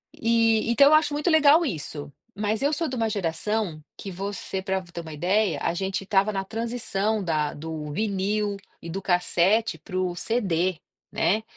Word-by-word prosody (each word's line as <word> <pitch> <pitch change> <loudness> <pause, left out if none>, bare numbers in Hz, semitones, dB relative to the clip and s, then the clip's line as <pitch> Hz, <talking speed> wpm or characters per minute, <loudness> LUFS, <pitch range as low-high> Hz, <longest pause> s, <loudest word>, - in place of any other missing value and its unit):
eh, 230 -1 +2
então 280 +4 +6
eu 305 - +5
acho 310 -1 +4
muito 300 +4 0
legal 315 +1 +6
isso. 150 - -5 0.3
Mas 215 +1 0
eu 285 +2 +2
sou 325 +1 0
de 255 - -4
uma 225 -2 0
geração 195 -2 -2
que 195 - -7
você 195 +1 -4
pra 190 0 -1
ter 170 -1 -8
uma 160 -2 -9
ideia, 180 0 +1
a - - 0
gente 190 +1 -2
estava 195 +2 +2
na 195 -1 -2
transição 220 -1 -2
da 155 -3 0
do 155 -1 -6
vinil 205 +1 -1 0.2
e 170 - -8
do 195 +2 -4
cassete 185 +4 +2
pro 185 -3 -3
CD, 185 -5 0 0.3
né. 215 +3 +1
200 Hz, 170 wpm, -25 LUFS, 175-225 Hz, 0.3 s, então